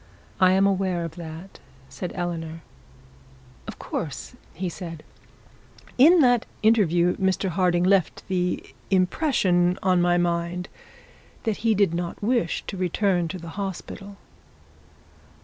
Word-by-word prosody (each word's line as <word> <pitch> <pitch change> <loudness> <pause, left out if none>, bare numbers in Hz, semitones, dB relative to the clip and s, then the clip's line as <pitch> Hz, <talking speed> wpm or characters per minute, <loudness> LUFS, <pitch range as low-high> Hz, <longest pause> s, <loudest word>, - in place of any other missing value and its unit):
'I 185 -1 +6
am 195 +1 +4
aware 190 -3 0
of 165 - -7
that,' 165 +2 -9 0.3
said 180 - -6
Eleanor. 165 -2 -4 1.0
'Of - - -7
course,' 160 - -5 0.3
said 165 -2 -7 0.9
he. 255 - +7
'In 350 0 +6
that 245 -3 +3 0.2
interview 180 -6 +3
Mr 190 0 0
Harding 175 0 +2
left 190 -1 +1
the 180 -1 -1 0.3
impression 185 - +2
on 185 -2 +3
my 175 0 +3
mind 175 +1 -1 0.7
that 220 -3 -1
he 225 -1 +1
did 200 -4 +2
not 170 0 -3
wish 215 -5 0
to 195 - -6
return 180 -1 +1
to 185 - -5
the 170 -1 -9
hospital.' 195 +1 -6
180 Hz, 125 wpm, -24 LUFS, 175-195 Hz, 1.0 s, he